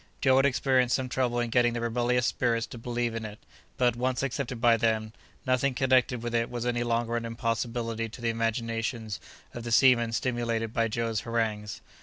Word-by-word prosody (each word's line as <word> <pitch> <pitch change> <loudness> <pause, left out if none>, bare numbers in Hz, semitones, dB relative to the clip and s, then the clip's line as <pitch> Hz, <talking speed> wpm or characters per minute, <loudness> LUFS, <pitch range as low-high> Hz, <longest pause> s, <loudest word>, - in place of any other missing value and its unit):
Joe 130 -1 +4
had 135 +1 +5
experienced 130 -1 +2
some 130 -1 -2
trouble 125 -1 0
in 120 -1 -1
getting 120 0 +3
the 120 - -2
rebellious 120 +1 +1
spirits 115 -2 0
to 120 - -10
believe 120 0 -2
in 115 0 -4
it; 105 -1 -7 0.4
but, 120 -2 +2
once 125 +2 -1
accepted 130 -2 -3
by 120 -1 +5
them, 110 -1 0 0.3
nothing 130 +1 +1
connected 130 -2 +2
with 120 0 -3
it 115 0 +1
was 120 -1 -4
any 120 -1 0
longer 120 0 0
an 115 - -3
impossibility 115 0 -2
to 110 - -11
the 115 -1 0
imaginations 115 -1 -2 0.3
of 120 - -6
the 120 - -5
seamen 120 -1 +5
stimulated 115 -2 -1
by 115 -2 +2
Joe's 115 0 -1
harangues. 110 -3 -2
120 Hz, 190 wpm, -28 LUFS, 115-125 Hz, 0.4 s, had